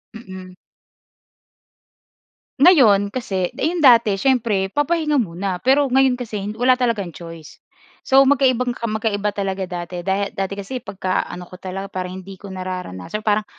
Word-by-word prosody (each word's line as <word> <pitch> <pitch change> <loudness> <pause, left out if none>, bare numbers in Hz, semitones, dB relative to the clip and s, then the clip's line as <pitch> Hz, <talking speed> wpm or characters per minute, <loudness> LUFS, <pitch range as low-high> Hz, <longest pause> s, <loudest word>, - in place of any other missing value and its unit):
Mm. 185 -4 -10 2.1
Ngayon 240 - +6
kasi 190 -7 -1
yung 340 +2 -1
dati 230 -8 +5
siyempre 220 -6 +1
papahinga 300 - 0
muna, 185 -1 -4
pero 275 +2 +4
ngayon 260 -1 +2
kasi 210 -4 -4
wala 255 +1 +4
talagang 225 -9 -2
choice. 165 -3 -11 0.4
So, 270 +1 +5
magkaibang 255 -3 +2
magkaiba 215 -3 -2
talaga 195 -1 -3
dati. 175 0 -5
Da 195 +1 0
dati 195 0 -3
kasi 230 +5 -5
pagkaano 185 -4 -3
ko 185 - -12
talaga 190 +1 -5
para 185 -2 -5
hindi 190 +1 -9
ko 200 +1 -11
nararanasan 185 - -6
parang, 210 0 +1
205 Hz, 135 wpm, -20 LUFS, 185-250 Hz, 2.1 s, Ngayon